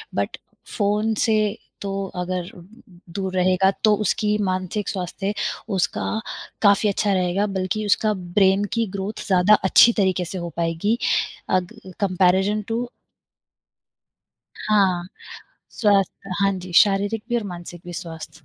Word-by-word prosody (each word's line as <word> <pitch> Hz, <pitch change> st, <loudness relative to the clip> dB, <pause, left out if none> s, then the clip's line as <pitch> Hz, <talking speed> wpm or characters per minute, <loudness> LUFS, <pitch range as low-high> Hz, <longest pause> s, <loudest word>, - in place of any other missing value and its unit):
but -, -, -2 dB, 0.4 s
phone 210 Hz, +1 st, +1 dB
से 215 Hz, -1 st, +1 dB, 0.2 s
तो 200 Hz, -, -3 dB, 0.2 s
अगर 180 Hz, 0 st, -3 dB, 0.6 s
दूर 190 Hz, 0 st, -3 dB
रहेगा, 185 Hz, +1 st, +3 dB
तो 215 Hz, -1 st, +5 dB
उसकी 210 Hz, +2 st, +1 dB
मानसिक 185 Hz, +2 st, -2 dB
स्वास्थ्य 195 Hz, +1 st, -3 dB, 0.4 s
उसका 185 Hz, -, 0 dB, 0.6 s
काफ़ी 200 Hz, 0 st, +4 dB
अच्छा 200 Hz, 0 st, +1 dB
रहेगा, 185 Hz, +2 st, +1 dB
बल्कि 195 Hz, +2 st, -2 dB
उसका 215 Hz, +1 st, +2 dB
ब्रेन 190 Hz, +1 st, +2 dB
की 230 Hz, -1 st, +1 dB
ग्रोथ 200 Hz, +2 st, -5 dB
ज़्यादा 190 Hz, +1 st, +4 dB
अच्छी 230 Hz, +5 st, +6 dB
तरीके 190 Hz, -3 st, +1 dB
से 185 Hz, +3 st, -5 dB
हो 170 Hz, -1 st, -4 dB
पाएगी, 170 Hz, +7 st, 0 dB, 0.5 s
अग 185 Hz, +3 st, 0 dB, 0.3 s
कॉम्पेरिज़न 190 Hz, +2 st, +2 dB
टू 235 Hz, +2 st, -2 dB, 1.8 s
हाँ, 190 Hz, -4 st, +2 dB, 0.6 s
स्वस्थ 195 Hz, -2 st, +1 dB
हाँ 195 Hz, 0 st, +3 dB
जी, 180 Hz, 0 st, -9 dB
शारीरिक 205 Hz, +2 st, +1 dB
भी 240 Hz, -, 0 dB
और 235 Hz, -, -1 dB
मानसिक 175 Hz, 0 st, -10 dB
भी 175 Hz, -, -8 dB
स्वास्थ्य 160 Hz, -2 st, -8 dB
195 Hz, 125 wpm, -22 LUFS, 180-210 Hz, 1.8 s, अच्छी